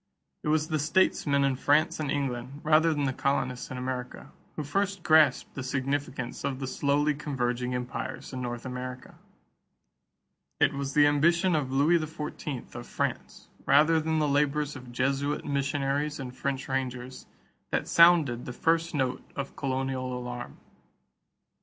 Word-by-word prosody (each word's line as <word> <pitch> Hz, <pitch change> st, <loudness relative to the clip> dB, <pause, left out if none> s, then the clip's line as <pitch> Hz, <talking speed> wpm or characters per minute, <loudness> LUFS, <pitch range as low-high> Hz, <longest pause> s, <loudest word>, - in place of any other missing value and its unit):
It -, -, -6 dB
was 155 Hz, +1 st, +1 dB
the 155 Hz, -1 st, 0 dB
statesmen 145 Hz, -2 st, +2 dB
in 135 Hz, -1 st, +2 dB
France 155 Hz, +5 st, +2 dB
and 150 Hz, -2 st, -2 dB
England, 135 Hz, 0 st, -3 dB
rather 160 Hz, +1 st, +4 dB
than 145 Hz, -2 st, -1 dB
the 135 Hz, -1 st, 0 dB
colonists 130 Hz, -2 st, -1 dB
in 130 Hz, -, -6 dB
America, 125 Hz, -1 st, -5 dB, 0.2 s
who 155 Hz, -, -3 dB
first 195 Hz, +5 st, -1 dB
grasped 155 Hz, -5 st, +4 dB
the 135 Hz, -, -5 dB
significance 130 Hz, -1 st, -3 dB
of 135 Hz, -, -2 dB
the 135 Hz, -, -3 dB
slowly 145 Hz, +3 st, +1 dB
converging 125 Hz, -4 st, -2 dB
empires 125 Hz, +2 st, -5 dB
in 130 Hz, -, -4 dB
North 120 Hz, -1 st, -5 dB
America. 125 Hz, 0 st, -7 dB, 1.4 s
It -, -, +4 dB
was 140 Hz, 0 st, -4 dB
the 145 Hz, -1 st, +7 dB
ambition 170 Hz, +5 st, +3 dB
of 140 Hz, -4 st, -1 dB
Louis 150 Hz, +6 st, +4 dB
XIV 150 Hz, -4 st, -6 dB
of 120 Hz, 0 st, -8 dB
France, -, -, -4 dB, 0.2 s
rather 155 Hz, +4 st, +5 dB
than 160 Hz, 0 st, 0 dB
the 155 Hz, -1 st, +2 dB
labors 145 Hz, +1 st, +1 dB
of 125 Hz, -2 st, -10 dB
Jesuit 135 Hz, +3 st, -1 dB
missionaries 140 Hz, +1 st, -1 dB
and 125 Hz, -2 st, -6 dB
French 135 Hz, 0 st, -3 dB
rangers, 130 Hz, -1 st, -4 dB, 0.4 s
that -, -, -1 dB
sounded 165 Hz, -8 st, +5 dB
the 125 Hz, -, -6 dB
first 165 Hz, +4 st, +1 dB
note 130 Hz, -2 st, 0 dB
of 140 Hz, -1 st, -5 dB
colonial 130 Hz, -2 st, -2 dB
alarm. 125 Hz, 0 st, -6 dB
140 Hz, 150 wpm, -28 LUFS, 130-150 Hz, 1.4 s, the